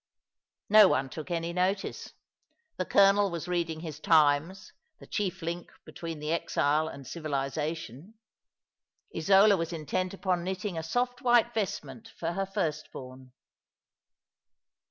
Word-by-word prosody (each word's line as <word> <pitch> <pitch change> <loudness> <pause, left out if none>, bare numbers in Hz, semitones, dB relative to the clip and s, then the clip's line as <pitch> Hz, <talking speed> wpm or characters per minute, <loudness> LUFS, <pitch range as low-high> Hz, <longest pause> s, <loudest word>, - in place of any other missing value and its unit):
No 215 -1 +8
one 135 -5 0
took 155 +2 -7
any 170 0 -2
notice. 185 +2 -2 0.6
The - - -1
colonel 200 0 +5
was 170 -2 -5
reading 170 -3 -2
his 155 -3 -7
Times, 155 +4 +2 0.2
the - - -14
chief 195 -6 -3
link 170 +1 -4 0.2
between 165 -2 -7
the 150 +1 -4
exile 155 -2 +1
and 140 -3 -9
civilization. 155 - -4 1.0
Isola 195 +5 +5
was 165 -1 -3
intent 180 +4 -2
upon 185 -3 -1
knitting 190 +1 -3
a 160 - -2
soft 245 +9 -2
white 240 -2 +3
vestment 150 - -4
for 165 0 -2
her 195 +2 -2
firstborn. 140 -9 -5
170 Hz, 125 wpm, -29 LUFS, 155-195 Hz, 1.0 s, No